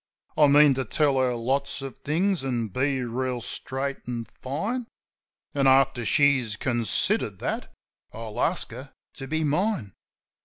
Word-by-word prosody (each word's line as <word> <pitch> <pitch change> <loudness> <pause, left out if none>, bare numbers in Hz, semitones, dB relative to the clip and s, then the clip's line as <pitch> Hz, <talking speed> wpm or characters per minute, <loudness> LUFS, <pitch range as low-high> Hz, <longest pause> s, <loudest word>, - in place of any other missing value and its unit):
I 150 - +6
mean 145 0 +7
to 130 0 -1
tell 140 +3 +1
her 125 -1 +2
lots 135 +4 -1
of 135 - -6
things, 175 +2 0
an' 120 -4 -1
be 130 +4 0
reel 125 +1 -2
straight 135 +3 -3
an' 120 -2 -3 0.2
fine; 205 - -3 0.7
And, 140 -1 +2
after 130 -2 +4
she's 135 -7 +3
considered 120 -5 0
that, - - -4 0.4
I'll 110 -1 -6
ask - - 0
her - - -10 0.2
to 135 - -7
be 160 +3 -1
mine. 155 - 0
135 Hz, 145 wpm, -26 LUFS, 125-145 Hz, 0.7 s, mean